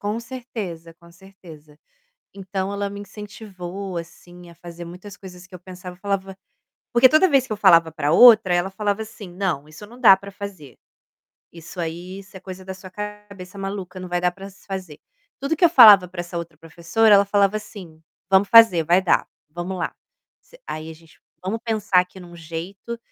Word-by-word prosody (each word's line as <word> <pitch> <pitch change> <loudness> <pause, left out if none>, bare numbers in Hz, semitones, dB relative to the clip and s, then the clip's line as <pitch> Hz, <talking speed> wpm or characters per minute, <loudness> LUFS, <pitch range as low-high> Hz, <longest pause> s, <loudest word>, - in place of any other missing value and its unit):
Com 205 +2 -3
certeza, 215 -10 -8
com 170 0 -20
certeza. 170 -5 -16 0.6
Então, 195 0 -4
ela 200 0 -3
me 200 0 -8
incentivou 200 -3 -8
assim 175 +1 -11
a 170 - -16
fazer 170 0 -10
muitas 180 +4 -11
coisas 180 -2 -12
que 185 - -13
eu - - -11
pensava, 180 0 -11
eu - - -27
falava 195 -1 -4 0.6
porque 240 +2 +6
toda 310 +7 +4
vez 275 -4 +3
que 245 - -6
eu - - -3
falava 170 -5 +5
pra 155 -1 -1
outra 220 -4 +7
ela 175 +2 0
falava 205 +2 -2
assim, 215 -3 -11
"Não, 175 -5 -3
isso 155 +7 -12
não 240 +4 -15
dá 215 -6 +8
pra 200 +1 -11
fazer, 195 -9 -10 0.8
isso 170 +2 -13
aí, 175 +3 -5
isso 195 0 -16
é 190 - -10
coisa 185 0 -10
da 190 - -6
sua 190 0 -12
cabeça 205 -2 -9
maluca, 195 -1 -6
não 185 - -8
vai 175 0 -1
dar 180 - +1
para 195 +2 -10
se 190 - -19
fazer". 185 -6 -7 0.4
Tudo 275 +4 -1
que 355 - +2
eu 345 - +8
falava 210 - +8
pra 175 0 -7
essa 175 0 -6
outra 170 -2 -8
professora 170 +7 +1
ela 200 0 +5
falava 200 +1 +2
assim, 190 -7 -13 0.3
"Vamos 195 +1 +4
fazer, 225 -8 +7
vai 175 +4 +3
dar, 185 - +1 0.2
vamos 175 +4 -5
lá, - - -3 0.5
você", - - -21
aí 155 0 -6
a - - -9
gente, 165 0 -22 0.2
vamos 215 +4 -3
pensar 215 -5 +2
aqui 180 +1 -8
em 180 - -12
um 175 0 -14
jeito 170 +8 -7
190 Hz, 200 wpm, -22 LUFS, 175-205 Hz, 0.8 s, dá